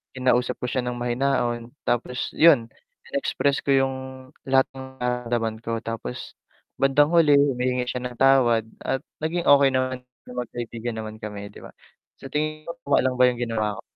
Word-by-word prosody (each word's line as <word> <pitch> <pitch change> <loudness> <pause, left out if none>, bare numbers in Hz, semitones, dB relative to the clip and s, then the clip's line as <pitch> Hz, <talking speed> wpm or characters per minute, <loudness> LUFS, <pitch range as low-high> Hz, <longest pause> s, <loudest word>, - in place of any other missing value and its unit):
kinausap 125 -1 +1
ko 125 - -3
siya 125 0 -1
ng 125 0 -3
mahinahon 120 -1 -1 0.2
tapos 125 +1 -1
yun, 145 -8 +6 0.4
inexpress 145 - 0
ko 140 - 0
yung 135 -1 +3 0.5
lahat 135 0 +3
ng 130 0 -7
nararamdaman 120 -2 -1
ko 115 0 -2
tapos, 115 - -6 0.5
bandang 135 +2 +4
huli, 150 -4 +6
humingi 125 -2 +1
siya 125 0 -3
ng 125 -1 -6
tawad 125 -4 +4 0.2
at 135 - -1 0.2
naging 170 +2 -1
okey 140 -1 +7
naman, 130 -1 -1 0.3
mag-kaibigan 120 -1 -5
naman 110 -1 -6
kami 105 -2 -6
'di - - -13
ba, - - -11 0.5
sa - - -8
tingin 155 +2 -3
mo 170 - -4
tama 140 - +3
lang 130 -1 0
ba 125 - +6
yung 120 -1 -4
ginawa 110 -4 -2
ko? - - -7
125 Hz, 170 wpm, -24 LUFS, 120-135 Hz, 0.5 s, okey